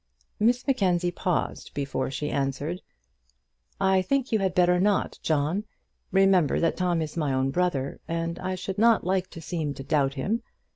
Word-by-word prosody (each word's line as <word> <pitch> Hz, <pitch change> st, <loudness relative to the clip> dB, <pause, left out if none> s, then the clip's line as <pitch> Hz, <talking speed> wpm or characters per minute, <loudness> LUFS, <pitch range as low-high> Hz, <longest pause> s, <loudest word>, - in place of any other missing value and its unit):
Miss 240 Hz, +3 st, +2 dB
Mackenzie 180 Hz, -9 st, +1 dB
paused 175 Hz, 0 st, -2 dB
before 140 Hz, -2 st, -2 dB
she 150 Hz, +2 st, -3 dB
answered: 140 Hz, +6 st, -2 dB, 1.0 s
"I 190 Hz, -1 st, +3 dB
think 265 Hz, +7 st, 0 dB
you 220 Hz, -, +3 dB
had 190 Hz, -2 st, 0 dB
better 180 Hz, 0 st, +4 dB
not, 200 Hz, +1 st, +1 dB
John. 155 Hz, +6 st, 0 dB, 0.5 s
Remember 190 Hz, -5 st, +4 dB
that 165 Hz, -, +1 dB
Tom 175 Hz, -3 st, +1 dB
is 155 Hz, -, -7 dB
my 150 Hz, -4 st, 0 dB
own 130 Hz, 0 st, +1 dB
brother, 145 Hz, -5 st, -1 dB
and 165 Hz, 0 st, -2 dB
I 185 Hz, 0 st, -2 dB
should 190 Hz, +2 st, -5 dB
not 230 Hz, 0 st, +5 dB
like 185 Hz, 0 st, 0 dB
to 165 Hz, -, -10 dB
seem 155 Hz, -3 st, -3 dB
to 135 Hz, -, -7 dB
doubt 135 Hz, 0 st, +1 dB
him. 210 Hz, -, -1 dB
175 Hz, 165 wpm, -26 LUFS, 150-190 Hz, 1.0 s, not